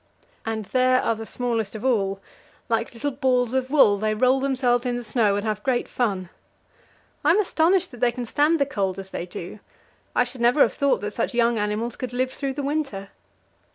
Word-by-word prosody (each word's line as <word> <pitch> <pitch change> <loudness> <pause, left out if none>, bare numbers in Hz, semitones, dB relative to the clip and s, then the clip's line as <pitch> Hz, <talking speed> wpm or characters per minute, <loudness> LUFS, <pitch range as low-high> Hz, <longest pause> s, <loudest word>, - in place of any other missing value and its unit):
And 220 -1 -2
there 255 +3 +3
are 230 - +1
the 225 0 -7
smallest 230 -4 -2
of 220 +3 -6
all 200 -6 +1 0.5
like 230 0 0
little 285 +5 -2
balls 255 -3 +1
of 260 0 0
wool; 220 -9 +5
they 215 0 0
roll 255 +4 +3
themselves 255 -3 +1
in 245 -1 -1
the 245 - -5
snow 215 -2 +1
and 205 +2 -2
have 215 -1 -2
great 245 +1 0
fun. 195 -7 -2 0.9
I - - +3
am - - +5
astonished 360 -2 +2
that 245 - -11
they 245 0 +3
can 245 0 -5
stand 295 +7 +2
the 280 - +3
cold 195 -8 -2
as 190 0 -8
they 175 - -5
do; 175 +4 -8 0.6
I - - +4
should 245 0 -8
never 245 +5 +4
have - - +5
thought 280 -1 +1
that 205 0 -3
such 230 +3 -2
young 235 -1 +2
animals 210 +3 -2
could 250 -1 -6
live 255 +1 0
through 275 -2 -3
the 285 +1 -4
winter. 275 -10 -3
245 Hz, 210 wpm, -24 LUFS, 215-260 Hz, 0.9 s, wool